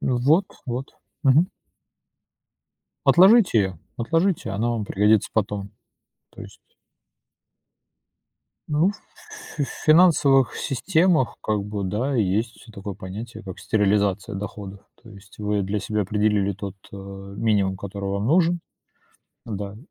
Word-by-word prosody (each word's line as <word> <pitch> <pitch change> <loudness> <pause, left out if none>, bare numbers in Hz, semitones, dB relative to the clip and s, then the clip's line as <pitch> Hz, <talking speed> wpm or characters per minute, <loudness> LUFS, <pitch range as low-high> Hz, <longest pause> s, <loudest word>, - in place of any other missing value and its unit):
М, 125 - 0
вот 155 +10 +3 0.2
вот, 125 +2 -4 0.3
мгм. 150 +7 +5 1.6
Отложите 190 - +6
её, 95 -4 -1 0.2
отложите 165 - 0
она 110 +5 -1
вам 115 -3 -2
пригодится 105 +1 +2
потом, 100 -2 -2 0.6
то - - -12
есть. - - -13 2.1
Ну, 155 +5 +2
в - - -13 0.6
фи - - 0
э, - - +1 0.2
финансовых 155 -5 +5
системах, 160 +2 +1
как 105 -2 0
бы, 105 -1 -4
да, 115 +9 -1
есть 110 +3 -1
такое 100 -1 -7
понятие, 105 +5 -8
как 95 -3 -8
стерилизация 105 0 +1
доходов. 100 0 -7 0.2
То 115 - -14
есть 100 0 -16
вы 105 -1 -1
для 100 +2 -2
себя 105 +2 -2
определили 105 0 +1
тот, 100 0 -7 0.2
э, - - -9
минимум, 100 0 -2
который 100 0 -5
вам 100 +1 -2
нужен, 170 +5 +3 0.9
да. 100 -2 -5
105 Hz, 125 wpm, -23 LUFS, 100-135 Hz, 2.1 s, Отложите